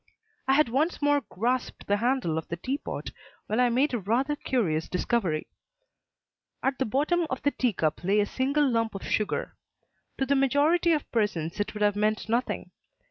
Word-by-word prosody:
I 265 - +4
had 305 +1 +4
once 285 +9 0
more 290 0 +3
grasped 245 +6 -2
the 205 - +2
handle 235 -9 +1
of 160 - -9
the 170 - -4
tea 265 +10 -2
pot - - -6 0.3
when 220 - -1
I 250 -1 +4
made 260 +4 +2
a 240 - 0
rather 245 +9 0
curious 175 - -1
discovery. 180 -4 0 1.2
At 270 0 0
the 265 - +1
bottom 310 +8 +1
of 260 - -4
the 285 - +3
tea 250 -5 0
cup 160 -1 -1
lay 200 +4 +3
a 205 - +3
single 275 +6 +1
lump 230 -4 0
of 195 - -6
sugar. 215 - -1 0.6
To 270 - 0
the 275 - +2
majority 290 +6 +3
of 300 - -2
persons 190 -8 -1
it 205 - -2
would 210 - -1
have 205 -1 +3
meant 215 +1 0
nothing. 235 +3 -1
245 Hz, 190 wpm, -27 LUFS, 205-275 Hz, 1.2 s, I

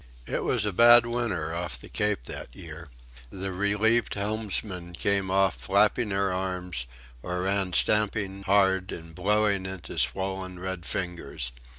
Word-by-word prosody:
It - - -2
was - - +1
a 105 - -1
bad 120 +3 +7
winter 115 -10 -2
off 85 -6 -3
the - - -11
Cape 105 -10 -1
that - - -7
year. 80 0 -10 0.4
The 95 +7 -5
relieved 105 +5 +1
helmsmen 100 -4 -2
came 100 +1 0
off 95 -6 +2
flapping 105 - +2
their 100 -1 0
arms, 90 -8 -3 0.3
or 90 +3 -3
ran 95 -1 0
stamping 100 -1 +2
hard 95 -1 +2
and 80 -1 -8
blowing 100 +1 +1
into 95 -3 -5
swollen, 95 -1 -1
red 95 -1 -5
fingers. 90 -9 -3
95 Hz, 145 wpm, -27 LUFS, 90-100 Hz, 0.4 s, bad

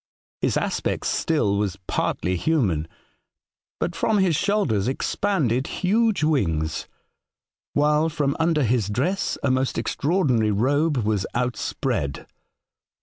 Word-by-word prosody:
His - - +1
aspect - - -1
still 105 -12 +1
was 100 -4 -1
partly 90 0 -1
human; 90 - +1 0.9
but 175 - -2
from 220 -2 +1
his 190 -5 +3
shoulders 150 - +1
expanded 135 - 0
huge 215 0 +1
wings, 80 - 0 0.9
while 150 +2 +3
from 145 -3 -1
under 160 -2 +2
his 115 -4 +1
dress 145 - -1
a 140 - +2
most 130 0 0
extraordinary 140 - +1
robe 145 +8 +1
was 105 -4 0
outspread. 120 - -2
135 Hz, 110 wpm, -24 LUFS, 105-165 Hz, 0.9 s, his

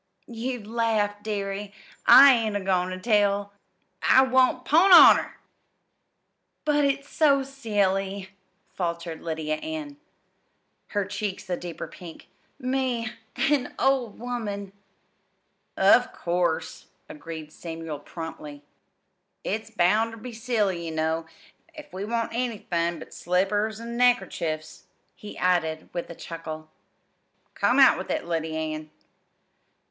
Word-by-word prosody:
"You'd 240 -1 -5
laugh, 215 -2 0
dearie. 200 -1 -4 0.4
I 275 0 +10
ain't 220 -3 0
a - - +1
goin' 185 -2 0
ter 185 - -5
tell." 200 -1 +1 0.5
"I 260 - +6
won't 260 -1 +2
'pon 345 +6 +5
honor!" 355 - +8 1.3
"But 295 -1 +2
it's 280 0 -1
so 280 -3 +3
silly," 200 -7 -1 0.4
faltered 170 -2 -4
Lydia 155 -2 -3
Ann, 310 - -6 0.9
her 205 -2 -1
cheeks 200 -2 -5
a - - +2
deeper 175 -1 -7
pink. 170 -3 -12 0.3
"Me 255 -4 -1 0.2
an 275 -3 0
old 265 -5 +1
woman!" 210 -5 -5 1.0
"Of - - +5
course," 175 -1 -2 0.2
agreed 155 0 -9
Samuel 165 -3 -7
promptly. 150 -3 -8 0.8
"It's 220 +3 -3
bound 220 +2 +2
ter - - -9
be 240 +2 -9
silly, 215 -7 -1
ye - - -4
know, 160 +1 -1 0.5
if 300 -1 -12
we 190 +2 -4
want 230 +1 -2
anythin' 190 -8 -2
but - - -11
slippers 205 +5 0
an' 235 +1 -6
neckerchiefs," 190 -10 0 0.3
he 210 - -11
added 160 -3 0
with 175 - -4
a 170 - -8
chuckle. 155 -2 -8 0.8
"Come - - +1
out - - +6
with - - -7
it, - - -2
Lyddy 160 -2 -2
Ann." 155 -1 -4
205 Hz, 120 wpm, -25 LUFS, 170-240 Hz, 1.3 s, I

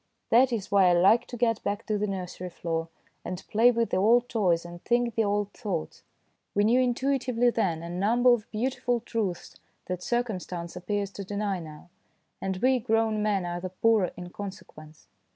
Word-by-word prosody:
That 250 +3 +5
is 220 -5 -3
why 195 -2 +5
I - - +4
like 195 +7 +4
to 245 - -7
get 230 -2 +1
back 205 +3 -3
to 215 - -1
the 210 0 0
nursery 185 -2 -5
floor, 165 -1 -3 0.3
and 180 0 -6
play 230 +3 +5
with 235 -1 0
the - - +1
old 235 +5 +4
toys 175 -7 +1
and 175 0 -10
think 240 -1 +1
the 225 - +1
old 205 0 -1
thoughts. 180 -7 -4 0.5
We 205 - +3
knew 235 +4 +4
intuitively 250 -1 +1
then 170 -8 -1
a 170 - -6
number 235 +7 +3
of 225 -2 -3
beau 225 +4 0
tiful 245 -2 -1
truths 215 -6 -4 0.3
that 180 -1 -4
circumstance 185 -7 -3
appears 200 +2 -2
to 200 - -7
deny 200 -1 -2
now, 155 +1 -11 0.5
and 190 -1 -2
we 255 +5 +3
grown 225 -2 +1
men 205 -3 0
are 175 0 -4
the 185 - -4
poorer 205 0 +2
in 175 0 -8
consequence. 175 -7 -10
205 Hz, 190 wpm, -27 LUFS, 180-235 Hz, 0.5 s, That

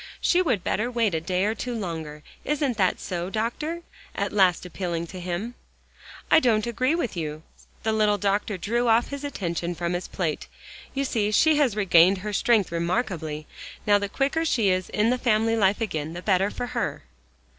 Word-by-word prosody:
"She 360 - +3
would 220 - 0
better 225 +4 0
wait 230 -5 +1
a 160 - 0
day 180 +3 0
or 215 - +1
two 245 +2 -4
longer. 160 -7 -5 0.2
Isn't 285 -4 0
that 185 -3 +2
so, 175 0 -4
Doctor?" 300 - -3 0.3
at 200 -1 -2
last 185 -4 +3
appealing 170 -2 -3
to 185 +2 -9
him. 180 +7 -4 0.8
"I 315 - +8
don't 225 -7 +2
agree 255 +6 +1
with 255 - -2
you," 155 -2 -4 0.4
the 220 - +1
little 210 -1 +3
doctor 205 0 0
drew 235 +6 0
off 230 +1 +3
his 280 0 -6
attention 175 - -3
from 170 +1 -2
his 175 +1 -3
plate. 165 -5 -3 0.5
"You 275 +1 0
see 215 -5 0
she 305 +8 +4
has 270 -8 +2
regained 190 -2 +5
her 210 - -3
strength 215 -3 +2
remarkably. 170 -4 -2 0.4
Now 205 -1 +5
the 200 0 -3
quicker 280 +8 0
she 230 -10 +2
is 185 0 0
in 215 +3 +2
the 250 - 0
family 225 -1 +2
life 200 -1 +2
again, 160 -7 -3
the 175 +1 -7
better 195 0 +2
for 245 - -4
her." - - -2
205 Hz, 190 wpm, -25 LUFS, 175-235 Hz, 0.8 s, I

